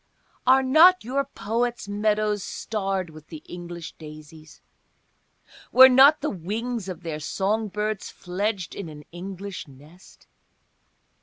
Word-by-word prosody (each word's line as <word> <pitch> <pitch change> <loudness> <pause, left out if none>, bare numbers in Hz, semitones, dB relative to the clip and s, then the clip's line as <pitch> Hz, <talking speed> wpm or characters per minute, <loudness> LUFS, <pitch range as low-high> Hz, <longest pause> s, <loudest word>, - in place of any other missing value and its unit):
Are 265 +1 +6
not 325 +8 +6
your 265 +4 -1
poets' 235 -2 -3
meadows 210 0 0
starred 195 -5 -3
with 155 0 -14
the 155 -1 -10
English 175 -1 -8
daisies? 155 0 -13 1.1
Were 260 +1 +9
not 270 +4 +6
the 300 - -1
wings 210 +4 -4
of 180 - -7
their 160 -2 -4
song 205 +8 -1
birds 210 0 -3
fledged 190 +1 -3
in 195 -5 -7
an 150 -1 -11
English 190 +1 -7
nest? 150 +7 -18
200 Hz, 125 wpm, -24 LUFS, 170-230 Hz, 1.1 s, Were